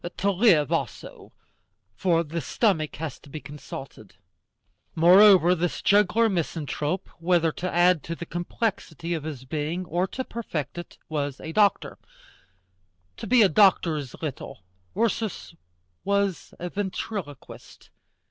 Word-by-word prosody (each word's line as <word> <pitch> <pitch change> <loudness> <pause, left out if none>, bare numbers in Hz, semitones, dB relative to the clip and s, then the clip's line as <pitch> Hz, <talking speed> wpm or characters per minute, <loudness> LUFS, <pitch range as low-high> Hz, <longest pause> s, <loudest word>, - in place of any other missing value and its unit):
To 200 +1 +1
live, 180 - +3
also; - - -4 0.6
for 165 - +1
the 165 +1 -4
stomach 160 - 0
has 155 -3 -6
to 145 - -17
be 155 - -7
consulted. 135 -7 -10 0.8
Moreover, 180 +1 +7
this 175 -1 -2
juggler 210 +3 +4
misanthrope, 165 -2 -2
whether 165 -1 +2
to 180 +4 -4
add 175 -1 +4
to 165 - -4
the 170 - -7
complexity 175 -2 -3
of 160 -3 -4
his 140 -5 -7
being 155 +6 -3
or 175 +2 -1
to 260 - -5
perfect 175 - -5
it, 175 - -10
was 145 -3 -3
a 160 - -7
doctor. 205 +2 +1 1.2
To - - -7
be 245 -2 +5
a - - +6
doctor 185 -3 +4
is 140 -5 -6
little: 140 -10 -6 0.3
Ursus 225 -5 -2 0.5
was 200 -2 -1
a 175 0 -6
ventriloquist. 190 -6 -6
175 Hz, 130 wpm, -25 LUFS, 155-195 Hz, 1.2 s, Moreover